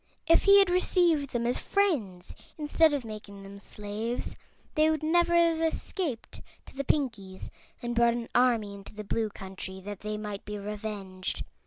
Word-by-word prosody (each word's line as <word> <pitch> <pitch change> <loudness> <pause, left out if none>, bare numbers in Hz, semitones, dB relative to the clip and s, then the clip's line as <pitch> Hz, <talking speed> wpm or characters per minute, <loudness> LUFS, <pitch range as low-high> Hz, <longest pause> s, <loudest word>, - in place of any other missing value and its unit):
If 330 +1 +4
he 400 0 +8
had 390 -3 +5
received 345 -5 +3
them 235 -2 -2
as 245 +1 +1
friends 235 - 0 0.2
instead 310 +1 +3
of 280 -4 -2
making 210 -2 -9
them 200 0 -10
slaves, 210 +4 -5 0.4
they 310 0 +4
would 315 -1 0
never 345 +2 +3
have 335 -1 +4
escaped 325 - -3 0.2
to - - -15
the 275 - -2
Pinkies 220 -11 -2 0.3
and 240 0 -2
brought 235 0 +4
an 235 -1 -4
army 235 -5 +3
into 200 +1 -11
the 215 - -6
Blue 220 +2 -1
Country, 190 -1 -8
that 205 0 -7
they 210 0 -4
might 210 -1 -5
be 210 0 -5
revenged. 200 -2 -5
230 Hz, 170 wpm, -29 LUFS, 205-310 Hz, 0.4 s, he